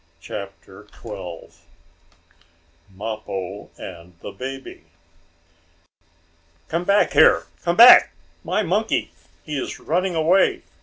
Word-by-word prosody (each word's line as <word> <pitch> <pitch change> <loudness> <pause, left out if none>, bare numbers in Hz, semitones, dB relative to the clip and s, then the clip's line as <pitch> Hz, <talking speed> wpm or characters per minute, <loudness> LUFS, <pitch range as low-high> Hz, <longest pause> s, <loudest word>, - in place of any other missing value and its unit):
CHAPTER 100 +2 -10
XII 95 -8 -9 1.4
MAPPO 100 -1 -6
AND 85 -1 -11
THE - - -8
BABY 135 +1 -9 1.8
"Come 170 +2 -2
back 200 +2 +2
here! - - +5 0.2
Come 170 -1 -1
back! 240 +2 +9 0.3
My 215 - -1
monkey! 205 +5 -1 0.3
He 150 -3 -4
is - - -7
running 180 +2 -1
away!" 165 +4 +2
125 Hz, 95 wpm, -21 LUFS, -, 1.8 s, back